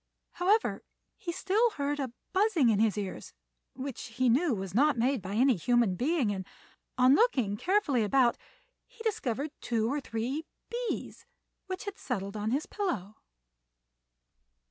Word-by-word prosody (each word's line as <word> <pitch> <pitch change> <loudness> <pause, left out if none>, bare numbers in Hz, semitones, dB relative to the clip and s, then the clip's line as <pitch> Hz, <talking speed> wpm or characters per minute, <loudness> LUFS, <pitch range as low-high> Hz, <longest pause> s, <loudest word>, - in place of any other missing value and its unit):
However, 410 +5 +1 0.3
he 345 - -5
still 410 +7 +2
heard 290 0 -1
a 265 -4 -2 0.2
buzzing 375 - +3
in 210 -3 +3
his 215 -1 +2
ears 195 -2 -5 0.4
which 265 -1 -5
he 245 +2 +1
knew 270 +2 +3
was 190 -2 -5
not 285 +4 +4
made 250 +1 +1
by 195 +2 -5
any 255 +2 +4
human 235 +2 +2
being, 255 - +1
and, 190 -2 -3 0.5
on 255 +1 +6
looking 265 - +3
carefully 295 - +2
about 240 +3 +3 0.5
he 475 -2 -13
discovered 300 - -1
two 230 +1 0
or 290 - -1
three 255 +6 -3 0.2
bees 480 0 -4 0.4
which 375 0 -4
had 405 0 -6
settled 200 -5 -3
on 210 +1 -2
his 275 +6 0
pillow. 215 - -3
260 Hz, 145 wpm, -30 LUFS, 225-345 Hz, 0.5 s, on